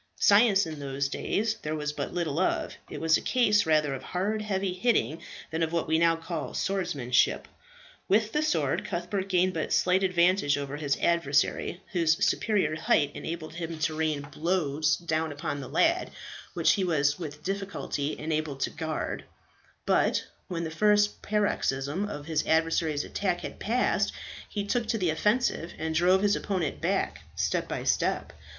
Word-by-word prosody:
Science 200 -2 +5
in 155 -2 -6
those 140 0 -2
days 220 +8 -1
there 155 +1 -3
was 150 -1 -3
but - - -4
little 170 -3 -1
of; 185 - 0 0.2
it - - -6
was 160 0 +4
a - - -6
case 210 -7 +3
rather 150 -3 +3
of 135 - -5
hard, 205 +4 -2
heavy 195 -3 -1
hitting, 185 -6 +1 0.3
than 160 +1 -2
of 160 -1 +1
what 170 -1 -1
we 160 +1 +2
now 165 0 +4
call 165 -1 -5
swordsmanship. 175 -11 +1 0.6
With 215 +2 +2
the 300 - +1
sword 175 - 0
Cuthbert 190 0 -3
gained 185 0 +2
but - - -3
slight 185 +1 +3
advantage 180 -4 +3
over 140 0 -4
his 145 -2 0
adversary, 170 +1 +1
whose 165 -4 +2
superior 190 -9 +1
height 145 -2 +2
enabled 160 -1 -6
him 165 -1 -5
to 155 0 -1
rain 155 -2 0
blows 155 -1 0
down 160 -2 -1
upon 145 0 -4
the 130 - -8
lad, - - +2 0.5
which 170 -2 +4
he 195 - +1
was 145 -4 +1
with 150 -3 -7
difficulty 195 -6 -3
enabled 155 -3 -2
to - - 0
guard; 160 -1 -3 0.6
but - - +2 0.2
when 170 -2 -3
the 160 - -4
first 210 +4 +3
paroxysm 185 -5 0
of 145 -6 -6
his 155 -1 0
adversary's 160 -2 +1
attack 190 -3 -2
had - - -7
passed, 240 +4 +1 0.4
he 205 -2 -3
took 230 +2 0
to 225 - 0
the 180 -6 +1
offensive, 210 -1 0
and 160 0 -2
drove 180 +4 +4
his 205 0 +3
opponent 185 -6 -2
back - - 0 0.2
step - - 0
by - - -4
step. - - 0
165 Hz, 170 wpm, -28 LUFS, 155-195 Hz, 0.6 s, Science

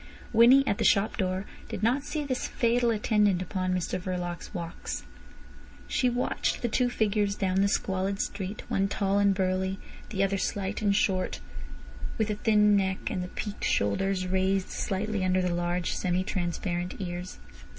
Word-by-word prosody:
Winnie, 245 +4 +7
at 200 - 0
the - - +1
shop 200 +2 +3
door, 190 -1 -1 0.2
did 200 - -5
not 245 +5 +3
see 300 +1 -3
this 255 -2 -2
fatal 240 -1 +2
attendant 210 -3 +2
upon 185 0 -2
Mr 185 0 -1
Verloc's 180 -2 -4
walks. 170 -3 -5 0.8
She 250 - +2
watched 245 +1 -1
the - - +2
two 245 +2 +1
figures 210 -3 +1
down 190 -1 +1
the 200 - +4
squalid 195 0 -1
street, 200 +1 -4
one 195 0 +1
tall 200 0 +1
and 200 0 +4
burly, 190 0 0 0.3
the 195 -3 0
other 195 0 +1
slight 195 +1 -2
and 200 -2 +2
short, 185 -2 +1 0.8
with 220 -1 0
a - - -1
thin 210 -1 +4
neck, 190 -1 0
and 185 - -2
the - - -5
peaked 205 +2 -6
shoulders 185 - +1
raised 190 +1 +1
slightly 205 +1 -2
under 185 0 +2
the 180 -1 0
large 175 0 -1
semi 180 0 0
transparent 175 -1 -2
ears. 180 -1 -5
195 Hz, 165 wpm, -28 LUFS, 185-210 Hz, 0.8 s, Winnie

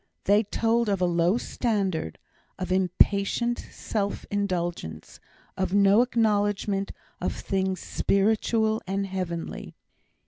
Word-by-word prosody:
They 205 +2 +4
told 225 +1 +1
of 200 -2 +1
a 180 - +2
low 175 +4 +2
standard, 195 - -1 0.4
of 185 - -4
impatient 200 +5 +2
self 205 -2 -4
indulgence, 175 - -3 0.4
of 190 0 -1
no 200 +2 +6
acknowledgment 205 -4 +1 0.3
of - - -1
things 190 -2 -2
spiritual 220 +2 +1
and 195 +1 -1
heavenly. 180 -3 -5
200 Hz, 105 wpm, -26 LUFS, 185-215 Hz, 0.4 s, no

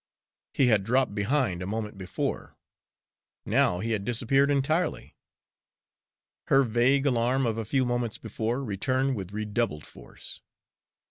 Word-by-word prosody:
He 135 - +4
had 110 -5 +3
dropped 125 +1 +1
behind 105 -3 0
a 90 - -4
moment 105 0 -4
before; 95 -2 -4 0.9
now 90 - +2
he 115 +2 -2
had 105 -3 -1
disappeared 125 +5 +2
entirely. 155 +4 0 1.3
Her 135 0 +5
vague 125 +4 +2
alarm 125 0 +2
of 115 -1 -1
a 110 - -3
few 130 +4 +1
moments 120 -2 -2
before 115 +4 -3
returned 130 +5 0
with 95 -3 -6
redoubled 105 - -2
force. - - -12
120 Hz, 130 wpm, -27 LUFS, 105-135 Hz, 1.3 s, Her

